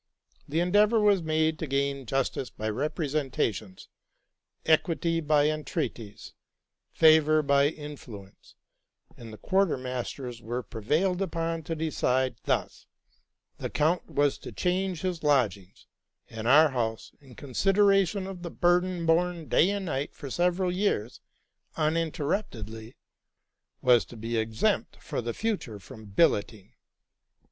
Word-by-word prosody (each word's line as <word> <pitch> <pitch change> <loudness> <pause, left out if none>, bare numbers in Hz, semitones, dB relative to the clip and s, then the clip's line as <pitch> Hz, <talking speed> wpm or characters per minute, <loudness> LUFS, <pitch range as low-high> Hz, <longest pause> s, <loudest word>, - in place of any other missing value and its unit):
The 160 +4 +1
endeavor 205 +5 +4
was 205 -3 +4
made 155 0 0
to 160 - -3
gain 140 -1 -1
justice 135 0 -1
by 110 0 -4
representations, 135 - -2 0.8
equity 165 +1 +2
by 150 -1 +3
entreaties, 150 - -5 0.6
favor 155 -1 +5
by 140 0 +4
influence; 135 -10 -10 0.6
and 115 -2 -11
the 110 - -10
quarter 190 - +1
masters 125 -1 -5
were 120 +3 -4
prevailed 155 - -1
upon 165 -2 -2
to 165 - -3
decide 130 -6 0
thus: - - -2 0.7
the - - -4
count 160 +4 0
was 145 -1 +1
to - - -9
change 180 -1 -1
his 180 -4 -2
lodgings; 110 -11 0 0.5
and 110 0 -5
our 150 +4 +7
house, 115 -4 -3
in 130 -4 -16
consideration 195 - +2
of 190 -2 -7
the 170 - -5
burden 175 0 +1
borne 170 0 +1
day 180 - +4
and 200 -1 -2
night 145 -4 -3
for 140 -4 -8
several 180 +3 +1
years 180 - -1 0.5
uninterruptedly, 145 - -2 0.9
was 125 -2 +5
to 120 - -12
be 115 +2 -4
exempt 110 0 0
for - - -5
the 120 0 -4
future 205 - -3
from 105 +3 -12
billetting. 100 - +1
150 Hz, 125 wpm, -27 LUFS, 120-175 Hz, 0.9 s, our